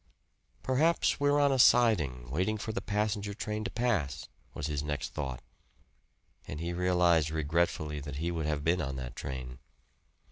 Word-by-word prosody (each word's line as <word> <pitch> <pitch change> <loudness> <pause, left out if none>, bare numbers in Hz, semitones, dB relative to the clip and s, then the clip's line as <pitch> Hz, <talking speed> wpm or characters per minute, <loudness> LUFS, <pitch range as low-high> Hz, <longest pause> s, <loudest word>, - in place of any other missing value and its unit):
"Perhaps 155 +6 +2
we're 145 0 +3
on 140 -1 +4
a 135 - +1
siding, 75 - +4
waiting 95 +9 0
for 110 - -4
the 100 - -3
passenger 105 0 -1
train 105 0 -3
to - - -1
pass," 105 - -1 0.3
was 70 - -4
his 75 -2 -1
next 75 -2 -3
thought; 65 -4 -5 1.0
and 75 - -5
he 85 +1 -3
realized 90 -3 +3
regretfully 75 -1 0
that 70 -1 -7
he 85 +4 -2
would 80 -3 -2
have 75 -2 -1
been 85 +2 +2
on 70 -2 -3
that 60 -2 -6
train. 65 -2 -6
85 Hz, 165 wpm, -30 LUFS, 70-105 Hz, 1.0 s, on